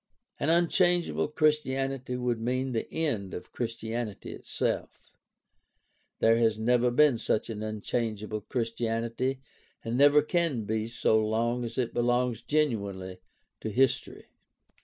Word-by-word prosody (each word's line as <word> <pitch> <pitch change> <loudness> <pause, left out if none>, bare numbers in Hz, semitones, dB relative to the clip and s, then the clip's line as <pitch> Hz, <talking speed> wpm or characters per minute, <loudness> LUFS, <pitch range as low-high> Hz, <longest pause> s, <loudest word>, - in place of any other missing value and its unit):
"An 145 - 0
unchangeable 175 +1 +2
Christianity 135 -4 0
would 125 -2 -1
mean 130 +3 -1
the 115 -2 -3
end 115 - -2
of - - -9
Christianity 115 -2 -4
itself. - - -4 1.1
There 115 0 +4
has 115 -2 +2
never 120 +2 +3
been 125 -1 +4
such 110 0 -1
an 105 -1 -5
unchangeable 110 0 -3
Christianity 115 +3 -2 0.4
and 115 +1 -2
never 145 +1 +6
can 165 -8 0
be 110 +1 -2
so 110 -1 +2
long 115 +3 0
as 115 -1 -6
it 125 -3 -1
belongs 120 -1 +1
genuinely 100 -11 -1 0.4
to 110 - -4
history." 130 +3 0
120 Hz, 120 wpm, -28 LUFS, 110-135 Hz, 1.1 s, never